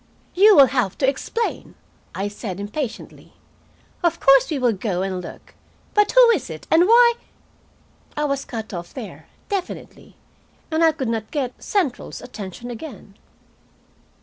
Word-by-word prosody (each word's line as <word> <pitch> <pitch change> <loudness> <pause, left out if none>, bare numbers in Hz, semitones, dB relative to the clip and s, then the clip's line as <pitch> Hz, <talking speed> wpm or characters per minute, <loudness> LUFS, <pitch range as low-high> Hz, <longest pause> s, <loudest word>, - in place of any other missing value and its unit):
"You 410 +3 +6
will 280 - +9
have 240 -8 0
to 265 - +1
explain," 455 - -3 0.4
I 195 +2 -2
said 205 -2 -6
impatiently. 220 +5 -6 0.7
"Of 340 -1 +1
course 270 -1 +5
we 305 - -1
will 250 -3 +2
go 190 -2 -2
and 190 -1 -3
look, 175 - -11 0.4
but 415 0 +3
who - - +7
is - - -1
it, - - -8
and 340 +3 +5
why 475 +1 +6 0.5
" - - -34
I 300 - 0
was 275 -2 -1
cut 220 -2 -7
off 175 -1 -7
there, 245 -6 -9 0.2
definitely, 395 -4 -6 0.6
and 320 +1 +2
I 325 - +6
could 275 -6 -4
not 220 -2 -3
get 265 -5 -4
"central's" 365 - -2
attention 230 +1 -8
again. 225 - -10
265 Hz, 150 wpm, -22 LUFS, 215-335 Hz, 0.7 s, will